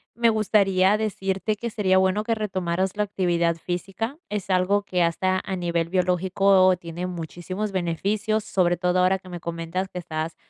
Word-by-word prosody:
me 235 0 +3
gustaría 200 -2 +3
decirte 200 -1 -1
que 235 +3 -4
sería 195 -4 +2
bueno 190 +3 +1
que 230 - 0
retomaras 190 -3 -2
la 210 - +2
actividad 175 -4 0
física, 195 - -4
es 205 -2 -4
algo 185 +2 +2
que 180 -3 0
hasta 185 +3 +1
a 190 - -2
nivel 170 -2 -1
biológico 185 +1 +3
tiene 170 +1 -6
muchísimos 180 +4 -5
beneficios, 200 +5 -1
sobre 175 -4 +1
todo 180 0 +1
ahora 185 +1 +3
que 185 - -14
me 175 -1 -6
comentas 170 +3 -3
que 180 - -6
estás 160 -1 -4
185 Hz, 165 wpm, -24 LUFS, 175-200 Hz, -, me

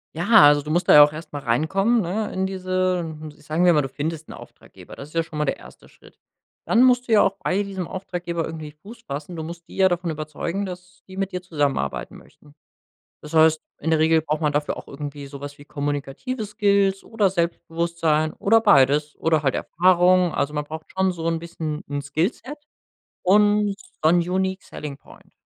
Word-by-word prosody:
Ja, 205 +6 +6
also 145 0 +5
du 150 - -9
musst 175 +3 0
da - - +7
ja 150 - +11
auch 145 - +3
erst 155 0 -10
mal 145 - -3
reinkommen, 195 - +1
ne, 205 +4 -2
in 190 0 -1
diese 185 -1 -1
hm, 155 -2 -6
ich - - -21
sagen 160 +4 +1
wir 175 - +6
mal, 150 - +3
du 135 - -4
findest 155 +3 -5
'n - - -8
Auftraggeber. - - -14
Das 140 - -9
ist 155 - -18
ja 165 - +2
schon 160 -2 -8
mal 150 - +1
der - - -1
1. - - -15
Schritt. - - -21 0.5
Dann 235 +2 +4
musst 250 -1 +3
du 230 - +1
ja 210 - +6
auch 195 - +1
bei 195 +3 +1
diesem 190 -3 -5
Auftraggeber 175 -3 -4
irgendwie 155 -2 -7
Fuß 210 +10 -14
fassen. 145 +5 -6
Du 160 - -5
musst 170 +1 -8
die - - -13
ja 190 -1 +4
davon 175 -1 -2
überzeugen, 160 +5 -4
dass 180 0 -10
die 190 0 -11
mit 195 0 -2
dir 180 - -4
zusammenarbeiten 145 - -2
möchten. 145 - -20 0.7
Das 150 +2 -10
heißt, 160 0 +5 0.2
in 160 - -1
der 160 - +3
Regel 160 0 +3
braucht 155 0 -2
man 150 -2 +1
dafür 145 0 -1
auch - - -11
irgendwie 145 0 -7
so 140 0 -10
was 145 0 -8
wie 145 - -15
kommunikative 145 - -4
Skills 200 -2 +1
oder 220 -3 +1
Selbstbewusstsein 170 -3 -1
oder 225 +2 +3
beides 150 -6 +4
oder 160 -2 +1
halt 135 -3 +1
Erfahrung. 180 0 +3
Also 145 +2 -1
man 150 - -2
braucht 155 +1 -8
schon 190 0 +2
so 165 -2 -6
'n 165 -1 0
bisschen 160 -2 -6
'n 145 0 -3
Skillset 185 - -3 0.7
und 205 +1 +3 0.3
One 170 +2 +4
unique 190 +1 -1
selling 150 -2 -8
Point. - - -19
165 Hz, 210 wpm, -23 LUFS, 150-190 Hz, 0.7 s, ja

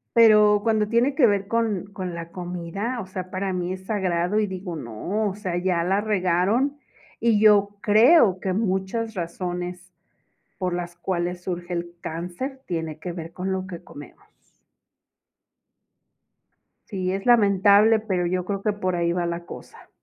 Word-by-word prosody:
Pero, 210 -2 +6
cuando 220 -2 +1
tiene 240 +5 +2
que 280 -4 +5
ver 200 -3 +1
con 220 -4 -1
con 185 -3 -5
la 170 0 -7
comida, 180 +7 -4
o 190 - -9
sea, 185 -1 -6
para 190 0 -2
mí 180 0 -2
es 190 0 -9
sagrado 185 -1 0
y 215 - +2
digo, 185 -2 -6
no, 165 - -3
o 190 - -6
sea, 185 -4 -3
ya 175 -1 0
la 190 +3 +1
regaron 210 +7 +1 0.4
y 230 -3 +3
yo 205 -2 +6
creo 215 - +5
que 185 0 -2
muchas 210 +2 -1
razones 180 +1 -5 0.7
por 180 -1 -1
las 175 0 -4
cuales 175 0 -3
surge 175 -1 -4
el 170 0 -4
cáncer 180 - -5
tiene 160 -3 -4
que 175 +2 -5
ver 165 -1 -7
con 185 +2 -4
lo 190 0 -3
que 180 -2 -8
comemos. 225 +10 -13 2.6
Sí, 185 -3 -2
es 195 0 -4
lamentable, 210 -1 +5
pero 190 -5 -1
yo 180 +1 -1
creo 200 0 -3
que 210 - +1
por 185 -3 -2
ahí 170 0 +1
va 175 0 -1
la 170 0 -4
cosa. - - -12
190 Hz, 160 wpm, -24 LUFS, 175-210 Hz, 2.6 s, Pero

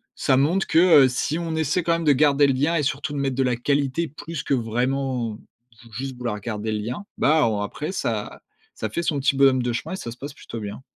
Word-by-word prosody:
ça 130 - +2
montre 165 +9 +2
que, 160 - +3 0.3
heu, - - +4
si 130 +5 -1
on 165 -2 -3
essaie 160 +3 0
quand 170 - +2
même 165 0 -1
de 150 - +6
garder 145 0 +4
le 135 - +2
lien 145 +6 +1
et 160 - +2
surtout 145 +2 -2
de 145 - -3
mettre 135 -2 -1
de 135 - +1
la 125 -1 +1
qualité 140 +5 0
plus 155 +2 -7
que 140 - +1
vraiment, 125 -1 -1 0.5
juste 130 +4 -5
vouloir 120 -4 -3
garder 110 +1 -3
le 105 - -1
lien, 120 - -5
bah 155 -5 +4
on 105 -2 -1
après 150 - -4
ça - - -3 0.3
ça - - -4
fait 170 - -3
son 150 -3 0
petit 135 0 +2
bonhomme 135 -2 +4
de 120 - -1
chemin 120 - -4
et 190 - -3
ça 120 - -6
se 120 - -11
passe 140 +3 -7
plutôt 115 - -8
bien. 105 +3 -7
135 Hz, 245 wpm, -23 LUFS, 120-150 Hz, 0.5 s, de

